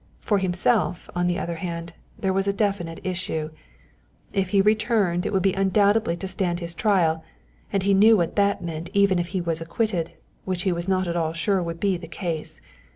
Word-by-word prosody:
For 205 -2 +1
himself, 180 -1 0
on 175 0 +1
the 175 0 0
other 170 -3 -3
hand, 170 -1 -5 0.2
there 190 -1 0
was 195 +1 0
a 200 - +2
definite 195 -5 -1
issue: 175 -4 -3 0.8
if 190 -2 0
he 200 - +3
returned 210 -3 +2
it - - -2
would 190 -3 +1
be 195 -1 +3
undoubtedly 200 -1 +2
to 190 - -5
stand 180 -2 -1
his 170 -1 -5
trial, 170 -5 +2 0.5
and 195 - 0
he 200 0 +3
knew 215 +3 +6
what 170 -3 -1
that 200 -2 +2
meant 165 0 -5
even 200 -2 +4
if 175 - -1
he 185 +1 -2
was 165 -1 -2
acquitted, 170 0 -1 0.3
which 185 -1 -2
he 190 - +2
was 170 +1 -3
not 185 -1 +1
at 170 - -2
all 160 -2 0
sure 190 +3 +1
would 170 -1 -4
be 195 -1 +1
the 170 - -9
case. 170 -5 -4
185 Hz, 205 wpm, -24 LUFS, 170-200 Hz, 0.8 s, knew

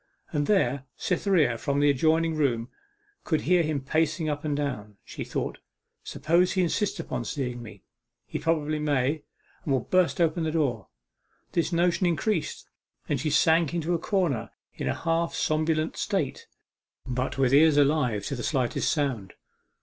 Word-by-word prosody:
And 145 -1 0
there 140 -10 +2
Cytherea 170 - +1
from 140 0 0
the 145 0 +5
adjoining 160 +4 +2
room 125 -6 0 0.5
could 155 -3 0
hear 180 +1 +3
him 155 -3 -1
pacing 160 +3 0
up 145 -1 -3
and 150 -2 -1
down. 105 -8 -4
She - - -6
thought, - - -4 0.4
'Suppose 175 +3 +1
he 185 - +2
insists 205 +4 -1
upon - - -3
seeing 125 -4 -4
me 105 -4 -11 0.4
he - - -5
probably 155 -2 0
may 145 0 0 0.4
and 145 - -3
will 130 -2 +2
burst 180 +8 +1
open 165 0 +2
the 160 - 0
door!' 135 -10 -1 0.6
This 170 0 0
notion 175 +1 +2
increased, 170 +2 -1 0.4
and 145 - 0
she 155 - -1
sank 160 +1 +3
into 170 +1 -1
a 170 - 0
corner 175 - 0 0.2
in - - -4
a - - 0
half 165 0 -1
somnolent 155 0 0
state, - - -2 0.6
but 130 +2 -2
with 135 -1 +2
ears 150 +1 +6
alive 140 -7 +2
to 140 - -3
the 120 - -5
slightest 130 -2 0
sound. 130 - -2
155 Hz, 160 wpm, -27 LUFS, 135-165 Hz, 0.6 s, ears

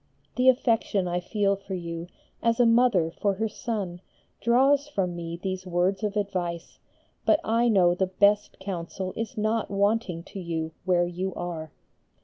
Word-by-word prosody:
The 255 0 +5
affection 225 -7 +2
I 175 0 0
feel 200 +2 +1
for 195 -1 -6
you, 170 -1 -5 0.3
as 230 0 +1
a 245 - +6
mother 230 -8 +4
for 200 +3 0
her 220 +3 0
son, 205 -5 -4 0.4
draws 270 +5 +3
from 190 -11 -2
me 170 0 -5
these 185 +1 -4
words 180 +3 +1
of 210 -1 -1
advice, 180 -4 -3 0.4
but 305 - +4
I 230 +2 +2
know 180 -5 +5
the 185 +1 0
best 200 +2 +2
counsel 185 0 -5
is 225 +1 -4
not 215 +1 0
wanting 200 -3 0
to 195 - -9
you 165 -2 -3
where 175 -2 +3
you 180 +2 -4
are. 165 -3 -5
195 Hz, 160 wpm, -26 LUFS, 175-220 Hz, 0.4 s, a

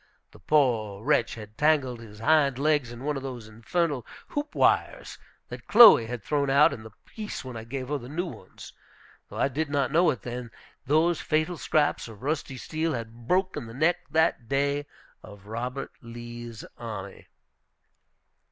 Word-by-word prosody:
The - - -16
poor 115 -9 +1
wretch 150 +4 +2
had 105 -1 -11
tangled 145 -6 +2
his 105 -2 -12
hind 140 -1 +3
legs 145 -3 +1
in 120 +2 -9
one 150 0 -1
of - - -5
those 125 -5 -7
infernal 130 +5 -1 0.3
hoop 290 +1 -4
wires - - +1 0.3
that - - -9
Chloe 215 - +9
had 120 -2 -6
thrown 140 +1 0
out 140 +2 +5
in 120 - -8
the 110 - -10 0.2
piece 215 -9 -7
when 130 -2 -7
I 110 0 -7
gave 130 +2 -5
her 145 -1 -1
her 120 - -10
new 170 +5 -2
ones. 170 - -11 0.6
Though - - -9
I - - +2
did 145 +3 -2
not 140 -3 0
know 170 +2 +4
it 130 -6 -2
then, 120 -1 -5 0.4
those 160 +4 +3
fatal 155 +3 0
scraps 150 -4 0
of 110 -1 -12
rusty 140 -2 -2
steel 160 +4 -2
had 115 0 -8
broken 185 -8 0
the 115 - -10
neck 165 +5 +3
that 155 -7 +1
day 140 +1 0 0.3
of 100 -2 -13
Robert 125 +5 -4
Lee's 120 -1 -9
army. 105 -5 -7
135 Hz, 170 wpm, -27 LUFS, 115-155 Hz, 0.6 s, Chloe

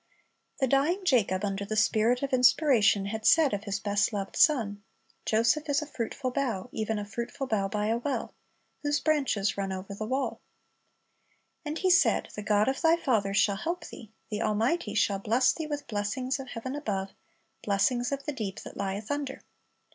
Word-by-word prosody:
"^ - - -44 0.5
The 270 - +2
dying 295 +9 +1
Jacob, 210 - +2
under 200 0 -2
the 210 +2 -4
Spirit 220 +4 +2
of 275 - -2
inspiration, 250 -6 +4
had 220 +2 -4
said 310 +1 +5
of 205 +1 -3
his 200 0 -2
best 205 +2 +1
loved 200 -2 -4
son, 220 -10 +3 0.5
"Joseph 230 +8 +2
is 285 - +3
a - - -6
fruitful 255 -1 -4
bough, 245 -5 -2
even 220 0 -2
a 205 - -4
fruitful 235 +6 -5
bough 215 -6 0
by 210 +1 -2
a 225 +2 +1
well; 275 +3 -3 0.5
whose 290 0 +1
branches 270 -12 +1
run 195 -1 -2
over 190 +1 -6
the 215 +2 -5
wall." 265 +3 -2 1.2
And 305 0 -4
he 370 +1 +2
said, 375 - +3
"The 210 - -5
God 210 0 +2
of 265 0 -1
thy 330 0 +4
father" 215 -11 0
"shall 200 -1 +3
help 340 - -3
thee," 220 -3 -11 0.2
the 210 +1 -2
Almighty 220 +4 0
"shall 200 -2 +2
bless 230 +6 +3
thee 320 -2 -5
with 290 -1 -4
blessings 255 +6 -2
of 265 - -7
heaven 245 +2 -5
above, 200 -10 -3 0.5
blessings 240 +5 +1
of 280 0 -3
the 295 - -2
deep 210 -7 -4
that - - -10
lieth 200 +3 -3
under." 285 -2 -4
230 Hz, 185 wpm, -28 LUFS, 205-275 Hz, 1.2 s, said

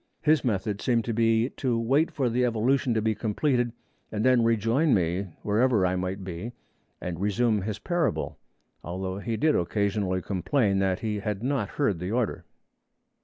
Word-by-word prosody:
His 155 0 +4
method 105 -3 -1
seemed 115 -3 +1
to 115 - -1
be 115 +1 +2
to 125 -4 0
wait 135 +8 +2
for 135 -4 -1
the 120 +2 +1
evolution 120 +2 +1
to 110 - +1
be 110 0 +2
completed 120 +3 0 0.4
and 110 +1 -1
then 125 -2 +5
rejoin 115 +6 +3
me 90 +1 0 0.2
wherever 110 -1 +3
I 90 0 +1
might 95 +1 -3
be 95 +6 -6 0.5
and 90 0 -5
resume 105 +1 +1
his 105 +1 -3
parable, 175 -3 -1 0.4
although 95 +3 -4
he 110 +2 -3
did 155 +4 +3
occasionally 95 0 0
complain 100 +1 +1
that 95 -1 0
he 105 -2 -2
had 105 0 -3
not 130 -6 0
heard 105 - +1
the 90 +2 -4
order. 120 -1 -1
110 Hz, 170 wpm, -27 LUFS, 95-125 Hz, 0.5 s, then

